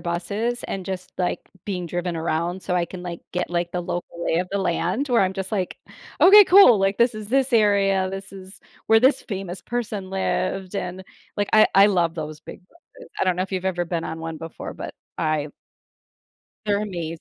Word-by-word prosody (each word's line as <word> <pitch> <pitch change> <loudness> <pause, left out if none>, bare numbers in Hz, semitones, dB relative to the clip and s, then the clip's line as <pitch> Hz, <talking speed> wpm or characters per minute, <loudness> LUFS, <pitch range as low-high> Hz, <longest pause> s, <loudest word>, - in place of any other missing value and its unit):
buses 200 +8 -2
and 190 -1 -5
just, 185 -1 -5
like, 180 -1 -1 0.2
being 180 -4 -3
driven 175 +1 -3
around 170 +3 -2
so 180 - -1
I 175 - +1
can, 180 +1 -9
like, 175 -1 -6
get, 180 -1 -2
like, 175 0 -1
the 180 - -1
local 170 0 -5
lay 165 - +1
of 180 - -2
the 200 - 0
land 190 +8 -1
where 240 -4 +3
I'm 185 -1 +2
just 190 -1 -5
like, 190 -4 -2 0.4
"Okay. 410 +3 +9
Cool. 360 - +7
Like, 195 +1 +1
this 235 +1 +3
is 215 -1 -7
this 270 +1 +1
area. 200 -4 +3
This 195 0 -7
is 190 0 -11 0.3
where 225 0 +5
this 260 +2 +4
famous 190 -3 -6
person 215 -5 -4
lived." 190 0 -2
And, 180 0 -4 0.3
like, 205 0 -1
I 215 0 +7
I 195 +1 +8
love 175 -5 +1
those 155 -2 -6
big - - -11
busses. - - -18
I - - +3
don't 185 -1 +2
know 185 - 0
if 190 - -6
you've 185 -1 -3
ever 180 -2 0
been 170 -1 -3
on 160 +1 -5
one 165 0 -5
before, 165 0 -8
but - - -7 0.2
I 155 -2 0 1.2
They're 205 0 +1
amazing. 170 -5 -4
190 Hz, 205 wpm, -23 LUFS, 175-205 Hz, 1.2 s, Okay